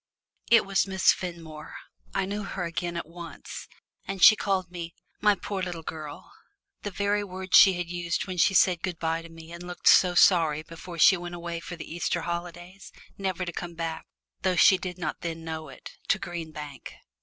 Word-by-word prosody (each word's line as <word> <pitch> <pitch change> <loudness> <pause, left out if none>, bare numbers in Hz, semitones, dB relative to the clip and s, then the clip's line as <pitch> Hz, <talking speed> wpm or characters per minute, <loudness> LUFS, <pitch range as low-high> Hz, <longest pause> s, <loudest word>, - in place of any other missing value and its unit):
It 230 -3 +6
was 195 0 +1
Miss 190 -1 +4
Fenmore. 165 -4 -8 0.4
I - - +1
knew 205 +2 -3
her 195 -2 -4
again 170 0 -3
at - - -4
once. 170 0 -9 0.4
And 195 -2 -2
she 215 - +10
called 190 -4 -1
me 170 -1 -7 0.2
"my 210 -1 +4
poor 195 -1 -4
little 175 -3 -4
girl" 155 -2 -8 0.5
the 205 - -4
very 205 +1 0
words 190 -1 -2
she 195 - +9
had 175 -1 -3
used 175 0 -2
when 185 -2 -6
she 195 +3 +3
said 180 -2 +4
good 185 -3 -3
bye 165 0 -1
to 165 - -12
me 165 0 -12
and 170 0 -8
looked 180 - -5
so 180 -1 +6
sorry 160 -4 +4
before 170 +2 -10
she 190 +4 +7
went 175 0 -7
away 170 -1 -5
for 175 +1 -8
the 165 - -8
Easter 175 0 -1
holidays, 175 +2 -6 0.3
never 185 -2 -2
to 175 - -5
come 175 0 -6
back, 165 -1 -4 0.3
though 185 -1 +1
she 190 +1 +6
did 180 -2 -5
not 175 -3 -4
then 165 -1 -5
know 160 -1 -5
it, - - -11 0.2
to - - +3
Green 170 -2 -6
Bank. 150 -4 -9
175 Hz, 200 wpm, -27 LUFS, 165-185 Hz, 0.5 s, she